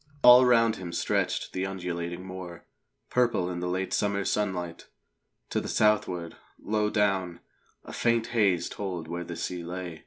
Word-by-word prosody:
All 125 +1 +10
round 115 -2 +4
him 90 -3 -6
stretched - - -1
the 95 +1 -1
undulating 90 -1 -4
moor, 95 -2 -8 0.5
purple 120 -8 +1
in 85 - -4
the 90 - -3
late 95 +1 -2
summer 100 -1 0
sunlight. 90 -5 -2 0.6
To - - 0
the - - -6
southward, 90 -6 +1 0.2
low 105 0 0
down, 95 -5 0 0.4
a - - -10
faint 115 -1 +1
haze 100 -7 +2
told 90 -5 -5
where 85 +1 -4
the 85 0 -7
sea 90 +1 -4
lay. 90 -1 -6
95 Hz, 155 wpm, -28 LUFS, 85-105 Hz, 0.6 s, All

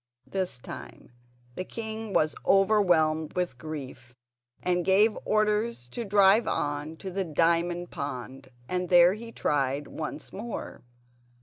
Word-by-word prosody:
This 185 -8 -3
time 120 - -10 0.4
the 185 - -4
king 220 +1 -6
was 155 -5 +2
overwhelmed 175 -6 +3
with 175 -9 -2
grief, 135 -5 -8 0.5
and 180 -1 +1
gave 205 +4 +4
orders 215 - +1
to 235 - -4
drive 200 +2 +5
on 145 +2 -2
to 190 - -6
the 195 +1 -1
diamond 170 +2 +1
pond, 135 -3 -6 0.2
and 180 +1 -2
there 175 0 +7
he 230 +2 -8
tried 140 -5 0
once 155 -1 -6
more. 225 +4 -6
175 Hz, 125 wpm, -28 LUFS, 150-200 Hz, 0.5 s, there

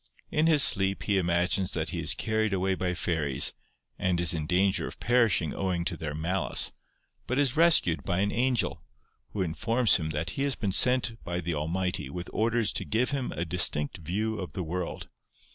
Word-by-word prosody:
In 155 +1 +2
his 150 -4 +6
sleep 95 0 +3
he 100 -2 +1
imagines 90 +1 0
that - - -2
he - - -4
is - - +2
carried 110 -1 -1
away 95 0 0
by 90 -1 -2
fairies, 80 -6 0 0.5
and 90 -2 0
is 85 0 +2
in 80 -2 -3
danger 95 +3 +1
of - - -10
perishing 115 -10 +2
owing 90 -3 -2
to 90 - -2
their 75 -2 -5
malice, 85 +5 -1 0.6
but 125 - -1
is 140 -3 +1
rescued 160 - +4
by 90 -2 -1
an 100 - 0
angel, 125 0 0 0.5
who 100 - -1
informs 115 +8 +2
him 80 -3 -4
that 80 +4 -3
he 135 - -4
has 140 -3 0
been 100 -3 -2
sent 125 +1 +2
by 85 +1 -3
the 85 -1 -3
Almighty 90 +5 -2
with 90 0 -7
orders 115 0 +1
to - - -2
give 120 +5 0
him 135 -3 -2
a 85 - -3
distinct 80 -4 +1
view 105 +7 -3
of 95 - -6
the 95 - -3
world. 85 +1 -4
95 Hz, 195 wpm, -28 LUFS, 85-115 Hz, 0.6 s, his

